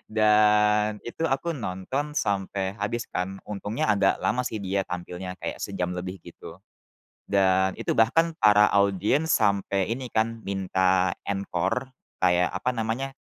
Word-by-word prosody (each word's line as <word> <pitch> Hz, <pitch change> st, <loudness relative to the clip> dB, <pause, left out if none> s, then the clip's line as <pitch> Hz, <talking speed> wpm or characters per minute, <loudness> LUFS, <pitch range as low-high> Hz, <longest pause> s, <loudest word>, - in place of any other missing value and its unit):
Dan 105 Hz, 0 st, +4 dB
itu 160 Hz, -, -5 dB
aku 165 Hz, +3 st, -1 dB
nonton 125 Hz, +6 st, -3 dB
sampai 100 Hz, -6 st, -2 dB
habis 105 Hz, +3 st, -3 dB
kan, 95 Hz, +1 st, -4 dB
untungnya 105 Hz, +2 st, -3 dB
agak 105 Hz, -2 st, +2 dB
lama 125 Hz, +2 st, 0 dB
sih 110 Hz, -3 st, -4 dB
dia 95 Hz, 0 st, -1 dB
tampilnya 90 Hz, +1 st, -6 dB
kayak -, -, -5 dB
sejam 90 Hz, -2 st, -3 dB
lebih 90 Hz, +1 st, -5 dB
gitu. -, -, -12 dB, 0.7 s
Dan 95 Hz, -1 st, +2 dB
itu -, -, -1 dB
bahkan 165 Hz, +9 st, +3 dB
para 105 Hz, -1 st, +6 dB
audiens 100 Hz, -, +2 dB
sampai 100 Hz, -, +1 dB
ini 125 Hz, 0 st, -6 dB
kan, 115 Hz, 0 st, -1 dB
minta 95 Hz, -2 st, +1 dB, 0.2 s
encore, 100 Hz, +6 st, -2 dB, 0.2 s
kayak 90 Hz, -1 st, +3 dB
apa 125 Hz, -, -1 dB
namanya, 120 Hz, +4 st, -3 dB
105 Hz, 135 wpm, -26 LUFS, 95-115 Hz, 0.7 s, para